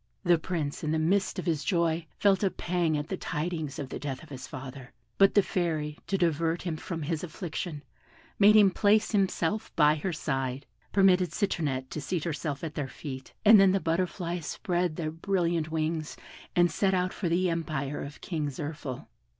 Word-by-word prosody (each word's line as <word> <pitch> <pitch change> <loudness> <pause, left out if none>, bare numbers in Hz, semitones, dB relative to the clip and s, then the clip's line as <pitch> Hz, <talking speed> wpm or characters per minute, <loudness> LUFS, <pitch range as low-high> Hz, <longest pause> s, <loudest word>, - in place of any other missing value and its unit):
The 175 -3 +4
Prince 160 -4 -3
in 155 - -1
the 160 - +1
midst 190 +6 +1
of 180 - -3
his 160 -5 0
joy 170 -2 +1
felt 195 -2 +3
a 195 - +4
pang 175 -4 0
at 145 +1 -4
the 190 - -2
tidings 160 -3 -3
of 140 -3 -5
the - - -5
death 140 +1 -5
of 160 - -14
his 135 -2 -8
father; 130 -1 -9 0.3
but 195 0 +6
the 205 - +6
Fairy 155 -5 -2
to 195 - +1
divert 165 -1 +1
him 170 -3 -2
from 165 0 -5
his 155 +1 -2
affliction, 160 -2 -5 0.6
made 210 +1 +7
him 205 -3 +7
place 210 +3 +3
himself 195 -1 0
by 150 -2 +5
her 180 +5 -2
side, 135 -4 -2 0.3
permitted 185 -2 +4
Citronette 140 -10 -1
to 155 - -4
seat 165 +2 -2
herself 155 -3 -3
at 160 -2 -4
their 145 -3 -3
feet, 130 -3 -8
and 215 0 +9
then 195 -1 +6
the 195 - +2
butterflies 175 0 -2
spread 175 -5 -1
their 155 -2 -3
brilliant 170 -2 0
wings, 160 0 -2 0.4
and 175 -1 +4
set 190 -2 +2
out 180 0 0
for 180 - -2
the 180 +1 +2
empire 155 -4 -2
of 145 +1 -9
King 155 -4 -2
Zirphil. 145 -2 -6
165 Hz, 190 wpm, -29 LUFS, 150-180 Hz, 0.6 s, and